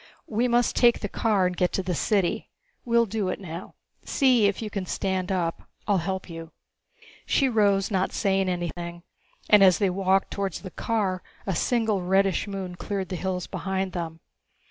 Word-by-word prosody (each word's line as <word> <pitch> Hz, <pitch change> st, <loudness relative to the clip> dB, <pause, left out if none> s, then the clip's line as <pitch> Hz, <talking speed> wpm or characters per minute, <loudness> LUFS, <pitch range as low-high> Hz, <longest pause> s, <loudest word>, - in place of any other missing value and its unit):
We 235 Hz, +3 st, 0 dB
must 240 Hz, 0 st, +2 dB
take 240 Hz, -1 st, +4 dB
the 205 Hz, -, -2 dB
car 205 Hz, -2 st, +1 dB
and 180 Hz, 0 st, 0 dB
get 180 Hz, 0 st, +1 dB
to 190 Hz, -, 0 dB
the 180 Hz, 0 st, -2 dB
city. 190 Hz, +1 st, 0 dB, 0.4 s
We'll 235 Hz, -1 st, +3 dB
do 210 Hz, -2 st, -2 dB
it 185 Hz, -, -2 dB
now. 175 Hz, -1 st, -8 dB, 0.3 s
See 250 Hz, -6 st, +3 dB
if 200 Hz, -, -1 dB
you 215 Hz, -2 st, -5 dB
can 195 Hz, -3 st, -4 dB
stand 190 Hz, 0 st, -1 dB
up 170 Hz, -3 st, -2 dB, 0.2 s
I'll 200 Hz, -3 st, +3 dB
help 190 Hz, +2 st, -3 dB
you." 165 Hz, -1 st, -9 dB, 0.7 s
She 275 Hz, -, +3 dB
rose, 205 Hz, -4 st, +2 dB
not 190 Hz, -1 st, +1 dB
saying 195 Hz, -2 st, +1 dB
anything, 175 Hz, -1 st, -4 dB, 0.4 s
and 210 Hz, -2 st, +7 dB
as 185 Hz, -2 st, +6 dB
they 200 Hz, -3 st, +1 dB
walked 190 Hz, +1 st, +1 dB
towards 195 Hz, -3 st, -3 dB
the 185 Hz, -, -8 dB
car 200 Hz, -5 st, -1 dB, 0.2 s
a 195 Hz, -, -1 dB
single, 220 Hz, -4 st, +1 dB
reddish 190 Hz, 0 st, +2 dB
moon 195 Hz, -3 st, -5 dB
cleared 195 Hz, -1 st, -3 dB
the 185 Hz, -, -3 dB
hills 180 Hz, 0 st, -2 dB
behind 190 Hz, -1 st, -3 dB
them. 165 Hz, -2 st, -5 dB
190 Hz, 180 wpm, -26 LUFS, 180-205 Hz, 0.7 s, and